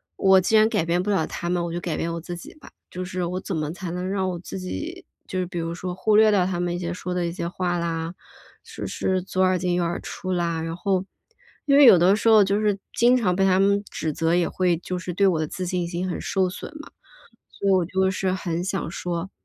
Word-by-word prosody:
我 190 -1 +5
既 205 +5 +1
然 215 0 +6
改 195 - 0
变 170 +2 0
不 210 - -1
了 190 -6 +1
他 175 - -4
们， 175 -1 0
我 170 - -3
就 175 - -3
改 170 -3 -3
变 170 - -2
我 170 - -3
自 175 +1 -6
己 170 - -11
吧。 305 - -15 0.2
就 185 +1 -5
是 185 0 -3
我 180 +2 -2
怎 190 - -4
么 155 -1 -2
才 180 0 -6
能 180 +2 -3
让 190 -1 0
我 180 - -3
自 190 +2 -7
己 330 - -6 0.2
就 185 - -3
是 180 - 0
比 175 0 -7
如 165 0 -3
说 180 +1 -4
忽 215 +2 +2
略 220 0 +7
掉 190 -3 +3
他 180 -2 -2
们 175 0 -1
一 - - -4
些 170 -1 -3
说 180 0 -4
的 180 -1 -1
一 - - -3
些 170 -1 -4
话 175 0 -2
啦， 165 0 -3 0.5
就 - - -7
是 185 -1 -1
左 185 +1 -2
耳 185 0 +3
进 180 -1 0
右 175 - +1
耳 170 0 -2
出 185 - -6
啦。 170 -2 -1
然 165 0 -4
后 190 +1 0 0.6
因 280 -1 +4
为 290 - +8
有 185 -7 +9
的 185 +3 +5
时 220 - -1
候 220 -2 +7
就 200 +2 +1
是 210 -2 +1 0.2
经 240 +2 +4
常 190 -8 +1
被 195 0 +2
他 185 0 +3
们 200 +1 +3
指 160 - -2
责， 165 +2 0
也 175 -1 +1
会 180 -2 +1
就 180 +1 -5
是 180 -1 -5
对 195 +2 +3
我 170 -4 +2
的 155 - -1
自 185 +3 -5
信 175 -1 -1
心 175 +2 -3
很 - - -3
受 190 -2 0
损 180 - -7
嘛， - - -13 0.6
所 200 - -4
以 - - +5
我 185 -2 +3
就 190 +2 +1
是 190 0 -1
很 175 -2 -2
想 195 -3 -2
说， 175 +2 -4
180 Hz, 290 characters per minute, -24 LUFS, 175-190 Hz, 0.6 s, 有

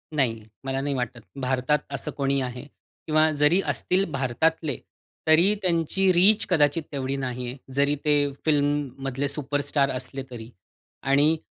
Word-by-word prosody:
नाही 115 -6 0 0.2
मला 135 0 -2
नाही 140 0 -1
वाटत. 125 -1 -3 0.2
भारतात 130 +3 +1
असं 135 - -3
कोणीही 140 -1 0
आहे. 125 +1 -5 0.4
किंवा 155 0 +4
जरी 155 +6 +4
असतील 190 +2 +1
भारतातले 140 +2 0 0.5
तरी 170 +6 +5
त्यांची 180 +2 +2
रीच 200 +5 +5
कदाचित 155 -1 +2
तेवढी 135 -1 -2
नाही 125 -2 -4
आहे. 125 +3 -6 0.2
जरी 140 +2 +2
ते 145 -1 +3
फिल्ममधले 145 -2 0
सुपरस्टार 140 0 +1
असले 130 +1 -4
तरी 115 -1 -8 0.5
आणि 145 +4 +3
140 Hz, 135 wpm, -25 LUFS, 130-155 Hz, 0.5 s, तरी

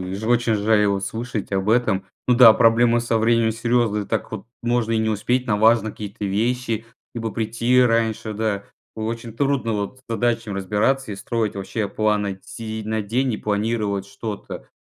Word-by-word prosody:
и 95 +1 -5
ж 105 - -5
очень 120 -1 +2
жаль 105 0 +3
вот 100 -1 0
слышать 115 -1 -4
об 95 +2 0
этом. 110 -5 +2 0.2
Ну 125 - +5
да, 120 -2 +9
проблемы 115 +1 +4
со 115 -1 0
временем 115 0 +2
серьезные, 115 -2 0
так 110 -1 -3
вот 110 0 -7 0.2
можно 120 -1 0
и 115 - +2
не 110 0 0
успеть 120 +4 0
на 105 -4 +1
важные 110 0 +3
какие-то 105 -1 -6
вещи, 115 +2 -1 0.3
либо 115 -1 -3
прийти 115 +3 +1
раньше, 115 -2 +1
да. 105 -2 -2 0.3
Очень 115 +1 -4
трудно 135 -2 0
вот 105 +5 -4
с 130 - -8
задачами 115 -2 -1
разбираться 105 +6 0
и - - -6
строить 110 0 -2
вообще 100 +2 -3
планы, 105 -2 0
сидеть 110 -1 -6
на 110 +1 -1
день 120 +5 0
и - - -3
планировать 105 -1 -1
что-то. 100 +1 -7
110 Hz, 180 wpm, -22 LUFS, 105-120 Hz, 0.3 s, да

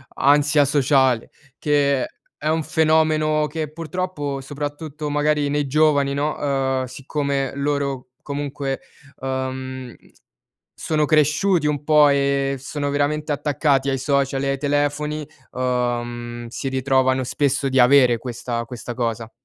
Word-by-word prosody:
ansia 145 +1 +4
sociale, 135 -4 +2 0.3
che 140 -2 +2
è - - -8 0.2
è 155 - -1
un 160 0 +1
fenomeno 155 -1 +2
che 155 0 -4
purtroppo 165 -4 -4
soprattutto 145 +2 -5
magari 150 0 +1
nei 145 0 0
giovani 145 -1 +2
no, 145 +2 -1
ehm, 135 -2 0
siccome 140 +1 -2
loro 140 -2 -2
comunque, 140 -1 -4 0.4
ehm, 130 -1 -4 0.8
sono 155 -1 0
cresciuti 155 +3 +2
un 150 -1 0
po' 150 -1 +5
e 140 -1 +1
sono 145 +2 -3
veramente 150 +2 0
attaccati 145 -1 +1
ai 135 - 0
social 135 0 0
e 135 - 0
ai 135 - 0
telefoni, 145 +1 -1 0.2
ehm, 120 -1 -2
si 120 +3 -5
ritrovano 130 0 +1
spesso 140 +1 0
di 130 0 +2
avere 125 -2 +5
questa 120 -1 -4
questa 120 +1 -7
cosa. 115 -2 -3
140 Hz, 125 wpm, -22 LUFS, 130-150 Hz, 0.8 s, po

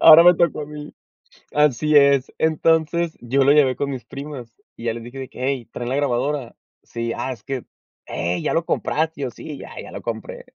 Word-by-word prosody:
Ahora 165 +1 +10
me 175 0 +8
tocó 170 -3 +1
a - - -6
mí. 150 0 -9 0.6
Así 150 0 +3
es. 140 -2 +5
Entonces 160 +1 +1
yo 130 +3 +2
lo 140 - +5
llevé 135 -4 +4
con 140 - -2
mis 130 -3 -5
primas 140 -5 -8 0.2
y 115 - -9
ya 115 - +1
les 115 0 -7
dije 120 +3 -10
de 130 - -6
que: - - -13
"Hey, 130 -2 -1
¿traen 120 0 -4
la 130 - 0
grabadora?", 140 -1 -1 0.3
"Sí", 115 0 -4
ah, 130 - -3
es 115 -2 -16
que 135 -3 -4 0.4
"Hey, 85 +1 -2
¿ya - - 0
lo 165 0 +1
compraste?", 160 -2 -1
y - - -1
yo: 125 - -2
"Sí, 150 +2 -8
ya - - -10
ya - - -10
lo - - -7
compré". - - -6
140 Hz, 220 wpm, -22 LUFS, 125-155 Hz, 0.6 s, Ahora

